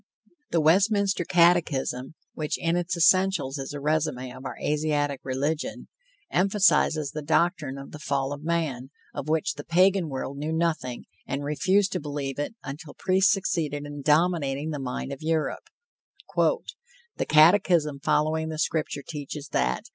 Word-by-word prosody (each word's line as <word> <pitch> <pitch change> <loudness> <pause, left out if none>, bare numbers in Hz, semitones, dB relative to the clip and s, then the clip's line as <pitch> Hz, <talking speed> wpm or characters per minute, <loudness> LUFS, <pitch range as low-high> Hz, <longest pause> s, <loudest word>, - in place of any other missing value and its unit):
The 165 - +2
Westminster 195 +3 +3
Catechism, 165 -7 +2 0.2
which 150 -1 -2
in 165 0 0
its 175 0 -1
essentials 170 -5 +3
is 135 - -5
a 145 - -5
resume 140 -4 -1
of 130 +1 -11
our - - -5
Asiatic 145 -2 0
religion, 140 +4 -3 0.4
emphasizes 170 -6 +3
the 155 - -5
doctrine 155 -2 0
of 135 - -9
the 150 - -9
fall 140 -2 -1
of 145 +1 -9
man, 155 -6 -2 0.2
of 140 - -5
which 160 -1 +1
the 145 +1 -8
Pagan 185 +1 +3
world 135 +1 -5
knew 150 +2 -3
nothing, 160 -7 -1 0.2
and 140 +2 -3
refused 185 +7 +2
to - - -1
believe 145 -2 -4
it 145 +10 -3
until 145 +2 -8
priests 190 +1 +3
succeeded 155 -7 -1
in 145 0 -7
dominating 150 -1 +1
the 150 - -4
mind 135 +1 -4
of 135 - -9
Europe: 160 0 -1 0.7
"The 485 0 -2
catechism 155 -2 +5
following 155 +3 +1
the 155 - -5
Scripture 155 -2 -1
teaches 145 -1 -6
that... 60 0 0
155 Hz, 150 wpm, -26 LUFS, 140-170 Hz, 0.7 s, catechism